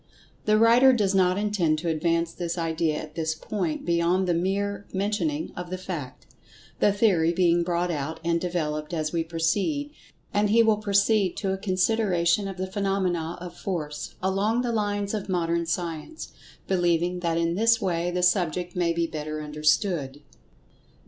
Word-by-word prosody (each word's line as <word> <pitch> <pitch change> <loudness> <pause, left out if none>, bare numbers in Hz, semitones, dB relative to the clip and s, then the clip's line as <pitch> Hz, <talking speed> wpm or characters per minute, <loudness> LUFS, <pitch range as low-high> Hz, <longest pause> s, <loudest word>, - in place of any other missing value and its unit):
The 215 0 +4
writer 235 +4 +6
does 205 -5 +1
not 185 -1 +3
intend 200 -7 +1
to 165 +3 -4
advance 165 +1 0
this 175 0 -4
idea 165 -1 0
at 155 0 -6
this 160 -1 -2
point 170 -1 -3
beyond 170 +2 +2
the 175 - +2
mere 200 +3 -1
mentioning 215 +11 -1
of 175 0 -6
the 185 - -3
fact—the 180 +3 -4
theory 190 -6 +3
being 175 -1 +3
brought 175 0 0
out 155 +1 -4
and 170 0 +1
devel[Pg 155 -4 -2
114]oped - - -9
as 155 -1 -2
we 165 -1 +1
proceed—and 205 - -2
he 230 +2 +5
will 220 -2 +3
proceed 200 -1 +2
to 195 -2 -1
a - - -2
consideration 190 -1 +1
of 195 -1 -6
the 185 - -2
phenomena 185 -4 -1
of 175 -1 -8
Force, 155 -6 -5
along 205 +6 +1
the 240 - -1
lines 205 -2 -1
of 205 -2 -4
Modern 170 -2 0
Science, 170 - -4 0.4
believing 175 -1 +1
that 170 -2 -1
in 170 0 +1
this 230 +5 +3
way 175 -4 -1
the 180 0 -1
subject 180 -1 +1
may 175 -2 +1
be 170 0 0
better 155 -1 -5
understood. 150 -1 0
180 Hz, 160 wpm, -26 LUFS, 165-200 Hz, 0.4 s, writer